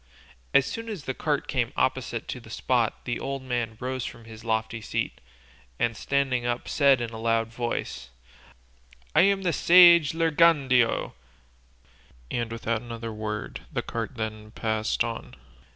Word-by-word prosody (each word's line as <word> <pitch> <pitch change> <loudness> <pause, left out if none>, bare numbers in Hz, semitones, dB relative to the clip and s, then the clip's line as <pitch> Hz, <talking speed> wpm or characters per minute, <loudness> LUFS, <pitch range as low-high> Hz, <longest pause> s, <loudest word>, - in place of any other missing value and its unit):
As 140 -1 +5
soon 230 +7 -5
as 200 -9 -5
the 130 - -3
cart - - -1
came - - 0
opposite - - -1
the - - -7
spot - - 0
the 120 - -2
old 135 -1 -4
man 120 -3 -2
rose 130 0 -3
from 115 -2 -8
his 110 0 -11
lofty 110 0 -1
seat, - - -3 0.6
and 115 -1 0
standing 135 -2 0
up 120 0 -2
said 140 -4 +4
in 115 -1 -3
a 110 - -7
loud 115 0 +1
voice, 115 - -4 1.0
"I - - +6
am 195 +1 +3
the 175 -3 +1
sage 170 -3 +7
Lirgandeo," 150 -7 +3 1.2
and 120 -1 -2
without 115 -1 -2
another 115 -2 -6
word 105 -1 -5
the - - -2
cart 115 +3 -4
then 110 -2 -5
passed 110 0 -1
on. 115 -1 -6
120 Hz, 150 wpm, -26 LUFS, 115-140 Hz, 1.2 s, sage